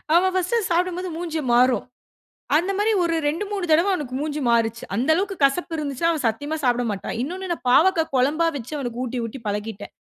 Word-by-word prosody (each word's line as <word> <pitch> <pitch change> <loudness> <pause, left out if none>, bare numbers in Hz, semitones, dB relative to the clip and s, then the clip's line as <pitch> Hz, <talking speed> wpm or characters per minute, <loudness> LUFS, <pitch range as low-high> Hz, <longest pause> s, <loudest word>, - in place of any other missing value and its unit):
அவன் 375 +2 +4
ஃபர்ஸ்டு 370 +6 +1
சாப்டும் 355 +1 +1
போது 365 0 -4
மூஞ்சு 330 -2 -3
மாறும். 250 +1 +4 0.7
அந்த 365 +5 0
மாரி 420 +2 +2
ஒரு 335 -1 +1
2 320 +7 -1
3 395 -3 -2
தடவ 335 +6 +4
அவனுக்கு 290 -8 -4
மூஞ்சி 300 0 -3
மாறுச்சு. 230 -1 +1
அந்த 255 +7 0
அளவுக்கு 390 +3 -1
கசப்பு 325 +5 +2
இருந்துச்சுனா 290 0 -3
அவன் 310 -5 -1
சத்தியமா 290 +8 -2
சாப்ட 245 -1 +2
மாட்டான். 200 - -4
இன்னொன்னு 365 +6 -4
நான் 330 -7 -4
பாவக்கா 330 +5 +5
குழம்பா 295 +6 +2
வச்சு 265 +2 -6
அவனுக்கு 245 -3 -4
ஊட்டி, 255 0 -4
ஊட்டி 230 +4 -7
பழகிட்டேன். 210 0 -4
305 Hz, 190 wpm, -23 LUFS, 245-350 Hz, 0.7 s, பாவக்கா